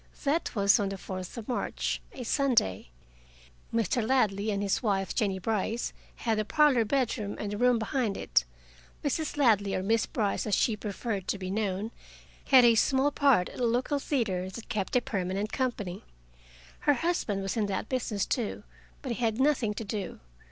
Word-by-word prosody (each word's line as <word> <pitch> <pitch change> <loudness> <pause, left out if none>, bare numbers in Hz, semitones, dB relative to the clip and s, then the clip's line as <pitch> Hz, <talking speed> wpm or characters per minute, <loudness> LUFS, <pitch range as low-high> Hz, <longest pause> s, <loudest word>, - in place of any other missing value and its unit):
That 295 +1 0
was 200 +2 +5
on 200 -1 0
the 195 - -5
fourth 185 +2 -7
of 225 - -7
March, 245 - -2
a 255 - -7
Sunday. 230 - +1 0.8
Mr. 230 +1 +1
Ladley 215 -4 +1
and 200 -1 -1
his 195 -1 0
wife, 195 -4 0
Jennie 200 -5 0
Brice, 220 +4 -1 0.2
had 225 -2 -1
the - - +1
parlor 275 0 +4
bedroom 230 -4 -1
and 205 - -3
the 205 - -3
room 250 -1 +4
behind 225 -2 -1
it. - - +2 0.6
Mrs. 300 +1 -1
Ladley, 210 -8 +3
or 185 - -1
Miss 225 +3 +2
Brice, 210 -1 -1
as 205 - +2
she 225 - +2
preferred 205 -1 -4
to - - 0
be 185 -1 -5
known, 205 +1 -1 0.5
had 260 -3 +7
a 235 - +7
small 265 +5 +3
part 275 -11 +3
at - - -10
a 245 - +2
local 255 +5 0
theater 200 -11 -1
that 220 +4 -9
kept 210 -3 -2
a 250 - +5
permanent 195 -1 -2
company. 210 -8 -2 0.8
Her 290 - +3
husband 240 - -1
was 195 - -2
in 215 -3 +1
that 200 +2 -2
business, 230 -6 -1
too, 235 -5 -2 0.4
but 260 - -3
he 235 - -2
had 225 0 +1
nothing 265 -7 +2
to 225 - -4
do. 205 -1 -5
220 Hz, 180 wpm, -29 LUFS, 200-250 Hz, 0.8 s, had